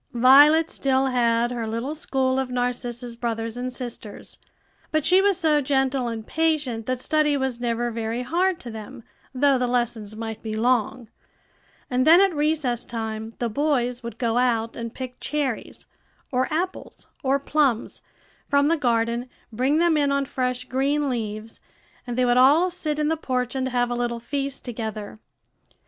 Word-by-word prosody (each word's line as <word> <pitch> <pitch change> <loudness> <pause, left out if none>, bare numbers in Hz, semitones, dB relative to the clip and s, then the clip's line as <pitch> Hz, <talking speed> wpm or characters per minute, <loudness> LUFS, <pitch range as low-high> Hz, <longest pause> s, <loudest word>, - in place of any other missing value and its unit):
Violet 290 +6 +6
still 265 -1 +1
had 240 -2 +2
her 235 -2 -3
little 230 +6 -3
school 265 -4 0
of 265 -1 -2
Narcissa's 245 -1 -3
brothers 230 -1 -3
and 250 +1 -4
sisters; 240 -4 -7 0.5
but 310 -1 0
she 370 +2 +5
was 400 -2 +3
so 310 -4 +2
gentle 265 -2 0
and 225 -2 -5
patient 295 -8 -1
that 255 -1 -1
study 300 +2 +2
was 265 -3 -2
never 240 0 -1
very 230 +2 -3
hard 350 +6 0
to 240 - -7
them, 220 +3 -9 0.3
though 270 0 +3
the 250 - +1
lessons 235 -4 -2
might 225 0 -6
be 215 -1 -4
long; 240 +1 0 0.8
and 255 +1 +1
then 335 +3 +8
at 390 -2 +4
recess 295 -5 0
time 220 -1 -5
the 240 - -1
boys 250 -1 0
would 235 -2 -7
go 235 -1 +1
out 230 -2 +1
and 230 0 -6
pick 255 -1 -7
cherries, 275 -6 -3 0.5
or 255 +3 0
apples, 360 +4 -4 0.2
or 270 -1 +2
plums, 280 -4 0 0.5
from 280 0 +3
the 335 - +2
garden, 235 -2 0 0.2
bring 260 +6 +1
them 340 -1 +3
in 285 -1 +2
on 280 0 +1
fresh 255 -2 -2
green 275 +3 0
leaves, 220 -2 -5 0.5
and 240 0 -4
they 255 - +3
would 245 0 +3
all 300 +8 +5
sit 310 -4 -3
in 300 0 +1
the 320 - +1
porch 250 -5 -2
and 260 -1 -1
have 245 -1 0
a - - -1
little 240 -1 -2
feast 275 +2 -4
together. 220 -3 -5
250 Hz, 170 wpm, -24 LUFS, 235-285 Hz, 0.8 s, then